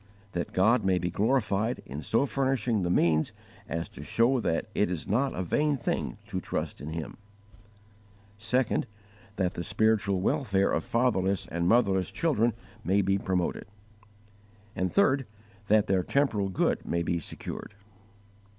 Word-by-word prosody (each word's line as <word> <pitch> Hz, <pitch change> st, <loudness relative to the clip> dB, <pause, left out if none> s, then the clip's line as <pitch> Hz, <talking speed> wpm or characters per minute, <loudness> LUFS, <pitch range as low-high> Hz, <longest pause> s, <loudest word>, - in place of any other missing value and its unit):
That 85 Hz, -2 st, -3 dB
God 110 Hz, +7 st, +3 dB
may 95 Hz, -1 st, +3 dB
be 90 Hz, 0 st, -2 dB
glorified 110 Hz, +1 st, +1 dB
in 70 Hz, +4 st, -6 dB
so 115 Hz, -, +2 dB
furnishing 130 Hz, -6 st, 0 dB
the 90 Hz, -, -1 dB
means 80 Hz, -3 st, +2 dB, 0.4 s
as 85 Hz, +1 st, -2 dB
to -, -, -11 dB
show 125 Hz, +3 st, +2 dB
that 85 Hz, -7 st, 0 dB
it 105 Hz, -, +1 dB
is 90 Hz, -3 st, -4 dB
not 130 Hz, +7 st, +1 dB
a 95 Hz, -, -2 dB
vain 145 Hz, -, +1 dB
thing -, -, -2 dB
to -, -, -4 dB
trust -, -, -4 dB
in 75 Hz, -, -6 dB
Him. 80 Hz, -1 st, -5 dB, 1.2 s
2. 125 Hz, +3 st, +1 dB, 0.5 s
That 90 Hz, -3 st, 0 dB
the 85 Hz, -, -4 dB
spiritual 105 Hz, -1 st, +1 dB
welfare 100 Hz, -1 st, +1 dB
of 80 Hz, -, 0 dB
fatherless 100 Hz, -6 st, +1 dB
and 85 Hz, +1 st, 0 dB
motherless 100 Hz, -6 st, +3 dB
children 120 Hz, -8 st, +1 dB, 0.3 s
may 100 Hz, +3 st, +2 dB
be 95 Hz, +1 st, +1 dB
promoted. 90 Hz, -2 st, -1 dB, 1.1 s
3. 135 Hz, -, +2 dB, 0.4 s
That 105 Hz, 0 st, +4 dB
their 95 Hz, -3 st, +2 dB
temporal 105 Hz, -4 st, +1 dB
good 95 Hz, -, 0 dB
may 85 Hz, 0 st, -1 dB
be 85 Hz, +1 st, 0 dB
secured. 90 Hz, +5 st, -7 dB
100 Hz, 145 wpm, -28 LUFS, 90-120 Hz, 1.2 s, That